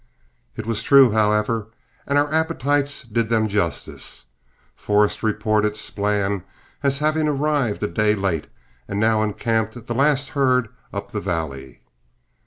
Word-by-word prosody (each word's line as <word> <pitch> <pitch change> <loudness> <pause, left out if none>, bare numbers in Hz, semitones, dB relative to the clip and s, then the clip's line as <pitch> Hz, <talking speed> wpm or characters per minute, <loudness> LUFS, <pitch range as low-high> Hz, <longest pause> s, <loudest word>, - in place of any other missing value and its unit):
It - - -6
was 115 -1 -1
true, 135 -4 +6
however, 105 +1 +1 0.4
and 140 - +2
our 145 +1 +1
appetites 145 -3 0
did 115 -1 -1
them 110 -1 +2
justice. 100 - -3 0.5
Forrest 105 0 +1
reported 105 -1 +1
Splann 100 -2 -1 0.4
as 140 -1 +1
having 155 +1 +1
arrived 145 -6 0
a - - +1
day 105 +5 +1
late, 95 -6 -1 0.4
and 100 - -3
now 110 0 +3
encamped 110 +2 -1
the 120 - -3
last 140 +1 +2
herd 130 -4 +2 0.2
up 100 0 -6
the 105 - -3
valley. 70 -9 -4
110 Hz, 135 wpm, -22 LUFS, 105-135 Hz, 0.5 s, true